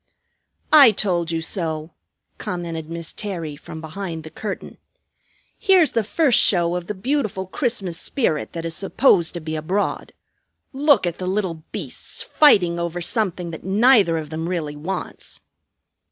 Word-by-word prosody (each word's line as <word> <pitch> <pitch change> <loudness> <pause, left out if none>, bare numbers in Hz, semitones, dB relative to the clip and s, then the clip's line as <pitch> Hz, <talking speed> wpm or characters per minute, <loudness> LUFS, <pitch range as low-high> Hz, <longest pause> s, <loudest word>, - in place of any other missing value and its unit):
"I 285 -5 +10
told 180 -5 -1
you 165 -1 -1
so!" 160 -2 -1 0.5
commented 165 -3 -5
Miss 165 -1 -5
Terry 170 -8 -4
from 160 +2 -10
behind 165 0 -6
the 155 - -10
curtain. 205 +4 -6 0.8
"Here's 375 -6 +4
the 230 - +1
first 265 +3 +3
show 175 -2 +3
of 175 -1 -4
the 210 - -4
beautiful 215 -3 -1
Christmas 190 - -2
spirit 225 - -1
that 165 -1 -5
is 165 -1 -4
supposed 195 - +2
to - - -3
be 155 -1 -5
abroad. 180 +7 -2 0.6
Look 285 -4 +4
at 175 -1 -3
the 185 - -4
little 185 -4 -2
beasts - - -5
fighting 180 - +4
over 170 0 -3
something 180 -2 -1
that 160 - -8
neither 200 -3 +4
of 155 -1 -6
them 160 +2 -3
really 155 -5 -3
wants!" 160 +6 -6
175 Hz, 150 wpm, -22 LUFS, 165-210 Hz, 0.8 s, I